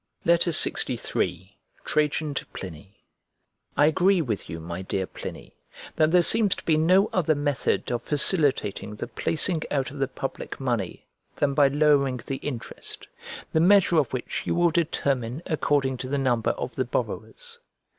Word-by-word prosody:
LXIII 165 Hz, -, +1 dB, 0.3 s
TRAJAN 150 Hz, 0 st, 0 dB
TO -, -, -3 dB
PLINY 95 Hz, +2 st, -10 dB, 0.7 s
I 145 Hz, -, +6 dB
AGREE 185 Hz, +4 st, +3 dB
with 110 Hz, -7 st, -4 dB
you, 80 Hz, -, -5 dB
my 85 Hz, +2 st, -6 dB
dear 95 Hz, 0 st, -2 dB
Pliny, -, -, -9 dB, 0.4 s
that 155 Hz, 0 st, +3 dB
there 175 Hz, +1 st, +5 dB
seems 215 Hz, -1 st, +3 dB
to -, -, -11 dB
be 160 Hz, -, +3 dB
no 185 Hz, +6 st, +4 dB
other 160 Hz, -4 st, +2 dB
method 145 Hz, -3 st, -1 dB
of 120 Hz, -, -1 dB
facilitating 140 Hz, -, 0 dB
the -, -, -5 dB
placing 165 Hz, 0 st, 0 dB
out 135 Hz, -3 st, -1 dB
of 145 Hz, -, -9 dB
the 135 Hz, -, +1 dB
public 135 Hz, +1 st, -6 dB
money 120 Hz, -8 st, -2 dB, 0.3 s
than 140 Hz, -1 st, +1 dB
by 140 Hz, 0 st, +5 dB
lowering 140 Hz, -3 st, +2 dB
the 135 Hz, -, -3 dB
interest; 130 Hz, -5 st, -7 dB, 0.5 s
the 160 Hz, -, +3 dB
measure 185 Hz, 0 st, +5 dB
of 145 Hz, -6 st, +2 dB
which 130 Hz, -2 st, -4 dB
you -, -, +1 dB
will 175 Hz, 0 st, +3 dB
determine 140 Hz, -5 st, -1 dB
according 145 Hz, -5 st, 0 dB
to 130 Hz, +1 st, -6 dB
the 140 Hz, -, 0 dB
number 125 Hz, -4 st, +1 dB
of -, -, -3 dB
the -, -, +1 dB
borrowers. 480 Hz, -1 st, -5 dB
145 Hz, 155 wpm, -25 LUFS, 125-165 Hz, 0.7 s, I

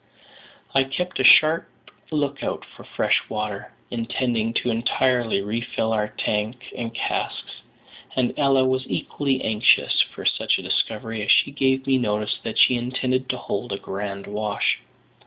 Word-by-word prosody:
I 135 Hz, -, +4 dB
kept 180 Hz, +7 st, -4 dB
a -, -, +2 dB
sharp 155 Hz, +5 st, +6 dB, 0.4 s
look 145 Hz, -2 st, -1 dB
out -, -, -3 dB
for -, -, -15 dB
fresh -, -, +1 dB
water, 105 Hz, -1 st, -4 dB, 0.2 s
intending 115 Hz, -1 st, -1 dB
to 125 Hz, -, 0 dB
entirely 120 Hz, -2 st, +1 dB
refill 115 Hz, +1 st, -2 dB
our 105 Hz, -1 st, 0 dB
tank 105 Hz, +3 st, -3 dB
and 120 Hz, -3 st, -4 dB
casks; 115 Hz, -, -4 dB, 0.5 s
and 125 Hz, -2 st, +1 dB
Ella 135 Hz, -2 st, +3 dB
was 130 Hz, 0 st, 0 dB
equally 135 Hz, -2 st, -1 dB
anxious 110 Hz, -1 st, +3 dB
for -, -, -5 dB
such -, -, +2 dB
a -, -, -7 dB
discovery, 110 Hz, 0 st, -2 dB
as 105 Hz, -, -4 dB
she -, -, +5 dB
gave 135 Hz, -1 st, +1 dB
me 135 Hz, -1 st, +3 dB
notice 105 Hz, -3 st, -1 dB
that 115 Hz, -, -5 dB
she 125 Hz, -, +5 dB
intended 130 Hz, +1 st, -1 dB
to 125 Hz, -, -1 dB
hold 110 Hz, +1 st, -4 dB
a 100 Hz, -, -2 dB
grand 100 Hz, 0 st, -5 dB
wash. 105 Hz, 0 st, -1 dB
120 Hz, 155 wpm, -23 LUFS, 105-130 Hz, 0.5 s, sharp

